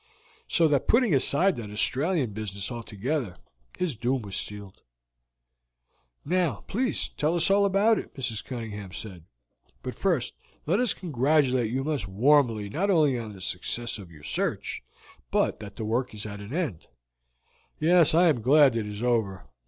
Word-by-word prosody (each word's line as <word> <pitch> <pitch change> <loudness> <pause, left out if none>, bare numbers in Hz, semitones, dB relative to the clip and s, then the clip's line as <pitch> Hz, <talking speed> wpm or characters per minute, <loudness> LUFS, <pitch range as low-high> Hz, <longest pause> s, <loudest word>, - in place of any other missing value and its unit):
So 165 -2 +4
that 145 -3 +1
putting 230 -6 +4
aside 165 +7 +3
that 110 -3 -6
Australian 135 - +1
business 100 0 -4
altogether, 120 - -3 0.4
his 180 -7 -1
doom 125 +2 -1
was 100 -2 -7
sealed." 100 -2 -6 1.4
"Now, 170 - 0
please, 250 +5 -1
tell 155 +3 -1
us 170 +2 +3
all 200 0 +4
about 200 +3 +3
it," - - -10
Mrs. 115 -6 -3
Cunningham 105 -6 -7
said. 95 -7 -8 0.6
"But - - -4
first - - 0 0.3
let 180 +8 +2
us 250 -3 +1
congratulate 135 - +1
you 130 +3 -1
most 145 -9 -2
warmly 115 0 +3
not 175 - -1
only 155 -8 +4
on 110 -2 -7
the 95 - -12
success 110 +6 -2
of 95 -4 -11
your 75 -2 -15
search, - - -2 0.5
but - - +1
that 100 -1 -9
the 110 - -5
work 115 +1 -1
is 105 - -5
at 105 -1 -7
an 100 +3 -9
end." 150 - -3 0.9
"Yes, 165 0 +4
I 175 +2 +6
am 140 -8 +2
glad 135 +1 +5
it 110 -2 -2
is 105 +2 -6
over. 110 - 0
125 Hz, 160 wpm, -27 LUFS, 105-160 Hz, 1.4 s, I